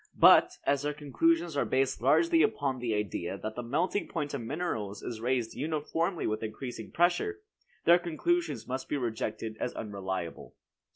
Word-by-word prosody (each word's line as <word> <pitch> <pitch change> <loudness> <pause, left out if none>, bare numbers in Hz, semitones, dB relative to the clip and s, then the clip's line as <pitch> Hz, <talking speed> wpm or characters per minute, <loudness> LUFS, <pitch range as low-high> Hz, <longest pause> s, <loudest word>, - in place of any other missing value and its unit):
But, - - +7
as 140 -1 +2
their 145 0 -2
conclusions 165 +4 +1
are 140 - +2
based 130 -2 0
largely 330 - +4
upon 140 -11 +1
the 120 -3 -1
idea 100 -2 -2
that 110 +2 -5
the 125 - -3
melting 160 +12 0
point 145 -1 -3
of 140 - -2
minerals 115 - -3
is 110 -2 -5
raised 120 -2 0
uniformly 160 +4 -1
with 110 0 -1
increasing 115 +1 -6
pressure, 180 - +1 0.4
their 175 +1 +7
conclusions 335 - -1
must 130 +1 -4
be 145 - 0
rejected 110 -2 -3
as 125 - -3
unreliable. 95 -5 -5
135 Hz, 160 wpm, -30 LUFS, 110-165 Hz, 0.4 s, But